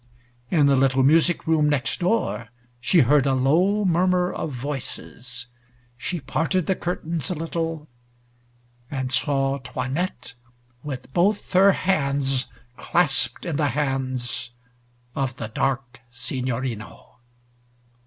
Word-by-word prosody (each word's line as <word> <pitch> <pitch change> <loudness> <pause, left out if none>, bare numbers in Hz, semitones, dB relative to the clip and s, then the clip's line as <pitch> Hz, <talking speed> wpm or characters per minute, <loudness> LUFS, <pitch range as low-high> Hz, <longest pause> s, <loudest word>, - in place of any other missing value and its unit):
In 155 -4 +4
the 140 -1 +5
little 135 0 +3
music 160 +4 +4
room 155 -2 +3
next 145 -3 0
door 180 - 0 0.3
she 170 +7 +4
heard 140 +2 +4
a 135 - +3
low 180 +11 +3
murmur 180 0 +2
of 160 - -3
voices. 125 -2 -5 0.5
She 150 +8 -4
parted 165 +5 0
the 190 - +1
curtains 170 -2 -2
a 180 - -1
little, 165 -1 -3 1.0
and 130 -3 -3
saw 135 0 +1
'Toinette 130 +3 -4 0.5
with 130 -2 -7
both 200 +4 +1
her 195 +2 +6
hands 140 -8 0 0.3
clasped 135 -7 +1
in 165 -5 -2
the 150 -2 +2
hands 130 -4 -2 0.6
of 135 -3 -2
the 110 - -6
dark 130 +1 -2
Signorino. 125 -2 -5
140 Hz, 115 wpm, -24 LUFS, 130-170 Hz, 1.0 s, her